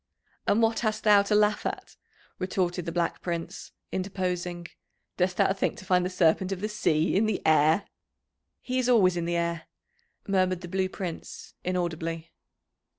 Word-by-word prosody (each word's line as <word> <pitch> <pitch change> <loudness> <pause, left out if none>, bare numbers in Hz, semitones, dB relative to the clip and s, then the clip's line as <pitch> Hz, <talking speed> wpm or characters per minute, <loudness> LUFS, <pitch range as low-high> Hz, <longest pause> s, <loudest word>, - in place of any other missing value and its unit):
"And 225 +3 +3
what 225 0 +2
hast 215 -2 -1
thou 210 -2 +6
to 200 +1 0
laugh 210 0 +3
at?" - - -5 0.4
retorted 180 -2 -1
the - - -1
Black 170 0 -1
Prince, 170 -2 -5 0.2
interposing. 180 -2 -3 0.5
"Dost 180 0 +1
thou - - +3
think 195 - -1
to - - -11
find 180 -1 +3
the 180 - -1
Serpent 180 +1 +2
of 195 - -2
the 210 +3 -2
Sea 160 -6 +1
in 215 +3 +3
the 215 - 0
air?" 160 +5 +4 0.8
"He 255 0 -1
is 255 -1 0
always 190 -7 +5
in 170 -1 -2
the 170 0 -1
air," 170 -1 -2 0.6
murmured 185 -2 +1
the 175 - -7
Blue 185 +1 -1
Prince, 180 -4 -7
inaudibly. 165 -2 -3
185 Hz, 165 wpm, -27 LUFS, 170-200 Hz, 0.8 s, thou